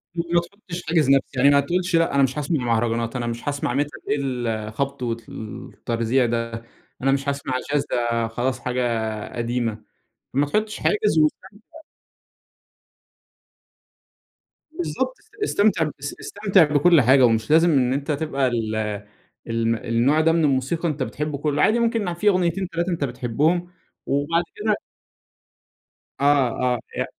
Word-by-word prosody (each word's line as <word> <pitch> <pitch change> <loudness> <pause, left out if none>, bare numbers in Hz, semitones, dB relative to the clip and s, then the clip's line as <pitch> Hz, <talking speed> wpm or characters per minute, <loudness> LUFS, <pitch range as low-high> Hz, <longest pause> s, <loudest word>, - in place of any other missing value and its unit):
ما 170 0 +1
تحُطش 180 -1 -9
حاجز 160 -4 +2
نفسي، 140 0 +4
يعني 140 - +6
ما 140 0 +5
تقولش: 175 +4 0
"لأ 165 -4 +2
أنا 140 - +5
مش 135 +2 0
هاسمَع 150 -1 -1
مهرجانات، 115 +1 0
أنا 120 -1 -2
مش 115 +2 -5
هاسمَع 140 -3 -2
Metal 145 - -11
إيه - - +2
الخَبط 125 +1 -3
والتَرزيع 115 +1 -2
ده، 115 0 -3 0.4
أنا 135 - +2
مش 140 +1 0
هاسمَع 140 -2 -3
Jazz، 145 0 -1
ده 115 -1 0
خلاص 120 +2 -2
حاجة 115 -4 -2
قديمة."، 115 -2 -2 0.5
ما 140 +3 +2
تحُطش 215 +8 -1
حاجز 210 -5 +1
واستمتع. 200 - -2 2.9
بالضبط، 355 +9 -3 0.3
استمتع 200 - +2
اس 145 +1 -5
استمتع 195 -3 +3
بكل 150 +1 +4
حاجة، 130 +2 +6
ومش 115 +2 +1
لازم 165 +2 +6
إن 130 -3 +2
أنت 140 +3 -2
تبقى 140 -2 0
ال 115 -3 -1 0.7
الم 115 0 0
النوع 120 +7 +2
ده 165 +1 +4
من 165 0 +2
الموسيقى 145 +4 +1
أنت 145 -3 -2
بتحِبه 150 +2 -3
كله، 145 0 0
عادي 230 +2 +4
ممكن 230 -6 0
في 205 +5 +2
أغنيتين، 185 0 +1
3 170 +2 -2
أنت 170 -4 -1
بتحِبهم، 140 +7 0 0.4
وبعد 145 +5 +1
كده 210 0 0 1.4
آه 140 -2 +4 0.3
آه، 120 - -2 0.2
ي - - +1
140 Hz, 140 wpm, -23 LUFS, 120-170 Hz, 2.9 s, يعني